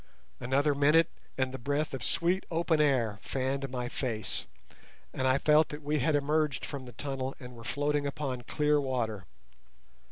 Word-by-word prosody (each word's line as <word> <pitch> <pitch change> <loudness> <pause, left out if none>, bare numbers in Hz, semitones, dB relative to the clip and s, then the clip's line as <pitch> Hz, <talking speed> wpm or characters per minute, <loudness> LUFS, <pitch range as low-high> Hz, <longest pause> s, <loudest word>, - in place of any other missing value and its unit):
Another 140 +4 +2
minute, 150 +3 +4 0.3
and 130 -1 +1
the 130 - -6
breath 145 +5 -1
of 130 -4 -4
sweet 175 - +1
open 165 -2 +2
air 120 -8 +2
fanned 135 +1 -2
my 125 -1 -3
face, 115 -4 -3 0.7
and 130 - 0
I 130 +1 +4
felt 150 +2 +4
that 150 0 -7
we 150 +1 +1
had 145 +4 +2
emerged 150 0 +1
from 140 -3 -6
the 125 - -10
tunnel 135 +1 -3
and 125 -1 -10
were 115 - -11
floating 145 +2 0
upon 135 -3 -3
clear 150 +4 +2
water. 115 -8 -2
140 Hz, 165 wpm, -30 LUFS, 130-150 Hz, 0.7 s, minute